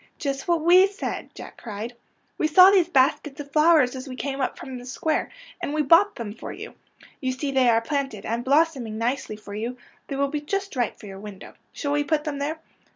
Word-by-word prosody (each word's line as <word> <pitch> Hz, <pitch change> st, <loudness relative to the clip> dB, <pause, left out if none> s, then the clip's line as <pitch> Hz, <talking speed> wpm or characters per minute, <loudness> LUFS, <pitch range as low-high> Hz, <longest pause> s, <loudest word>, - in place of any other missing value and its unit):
'' -, -, -41 dB
Just 275 Hz, +2 st, -3 dB
what 340 Hz, -3 st, +1 dB
we 365 Hz, +3 st, +7 dB
said," 390 Hz, 0 st, -5 dB
Jack -, -, -10 dB
cried. 220 Hz, +1 st, -6 dB
^' -, -, -25 dB, 0.4 s
We 310 Hz, -, +2 dB
saw 365 Hz, +5 st, +8 dB
these 365 Hz, -4 st, +4 dB
baskets 280 Hz, -1 st, +2 dB
of 285 Hz, -1 st, -8 dB
flowers 305 Hz, -4 st, +4 dB
as 260 Hz, +2 st, -7 dB
we 255 Hz, -, -6 dB
came 275 Hz, +1 st, -3 dB
up 260 Hz, -, -1 dB
from 260 Hz, -2 st, -7 dB
the 245 Hz, -, -11 dB
square, 310 Hz, +5 st, -1 dB, 0.3 s
and 290 Hz, -, -3 dB
we 305 Hz, -, +2 dB
bought 335 Hz, +8 st, +5 dB
them 220 Hz, -3 st, -6 dB
for -, -, -8 dB
you. -, -, -9 dB, 0.5 s
You 260 Hz, -1 st, -1 dB
see 275 Hz, +2 st, -3 dB
they 260 Hz, -2 st, +4 dB
are 230 Hz, -1 st, +4 dB
planted 270 Hz, -5 st, -3 dB
and 230 Hz, +2 st, -2 dB
blossoming 275 Hz, -5 st, +1 dB
nicely 235 Hz, -1 st, -2 dB
for 210 Hz, -1 st, -11 dB
you. 230 Hz, +4 st, -4 dB, 0.3 s
They 275 Hz, -, -4 dB
will 280 Hz, 0 st, +1 dB
be 300 Hz, 0 st, -3 dB
just 395 Hz, +5 st, -3 dB
right 245 Hz, -4 st, -1 dB
for -, -, -12 dB
your 195 Hz, -1 st, -9 dB
window. 205 Hz, -2 st, -10 dB, 0.2 s
Shall 285 Hz, -, -3 dB
we 290 Hz, 0 st, +2 dB
put 300 Hz, +1 st, 0 dB
them 290 Hz, -2 st, -4 dB
there? 300 Hz, +3 st, -2 dB
275 Hz, 230 wpm, -24 LUFS, 240-310 Hz, 0.5 s, saw